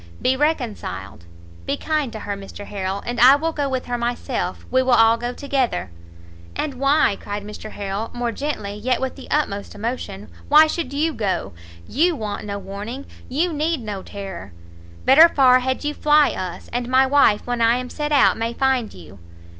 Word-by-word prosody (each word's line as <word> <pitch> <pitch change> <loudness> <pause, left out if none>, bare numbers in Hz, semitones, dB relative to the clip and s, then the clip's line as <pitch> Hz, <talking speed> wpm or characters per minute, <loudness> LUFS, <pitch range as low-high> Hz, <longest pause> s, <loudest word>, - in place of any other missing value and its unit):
be 260 - +2
reconciled, 235 - -3 0.4
be - - 0
kind 305 -5 -1
to 220 -2 -7
her, 205 - -4
Mr 200 +1 -9
Harrel! 195 -1 -4
and 240 -1 -3
I 255 +4 +8
will 325 +3 -1
go 290 -3 -2
with 260 -1 -2
her 245 0 -3
myself, 240 +1 -3
we 260 - +4
will 260 -1 +2
all 225 0 +6
go 240 +1 -4
together!" 250 - -2 0.6
"And 300 -2 -2
why," 275 -7 +3
cried 205 0 -5
Mr 210 +1 -8
Harrel, 200 +2 -4
more 240 -1 -2
gently 250 -8 -4
yet 240 +5 -1
with 265 -1 -3
the 270 - -12
utmost 205 -10 -1
emotion, 210 -2 -5 0.2
"why 305 +2 +8
should 310 -3 -3
you 310 +3 0
go! 195 - -2 0.3
you 330 +6 +2
want 210 -5 -5
no 200 0 -3
warning! 205 +7 -7 0.2
you 320 +6 0
need 310 -1 -1
no 205 -3 -5
terror! 190 - -8 0.5
better 315 +6 +8
far 255 -4 +5
had 260 +2 -2
you 295 0 -1
fly 300 0 +4
us, 185 -2 -6
and 245 0 -2
my 260 +1 +5
wife 265 -6 +3
when 245 -1 -2
I 230 +1 +4
am 250 0 -5
set 295 0 -3
out 285 -2 +4
may 230 +1 -2
find 260 -4 +1
you." 90 +2 -13
245 Hz, 185 wpm, -21 LUFS, 205-280 Hz, 0.6 s, I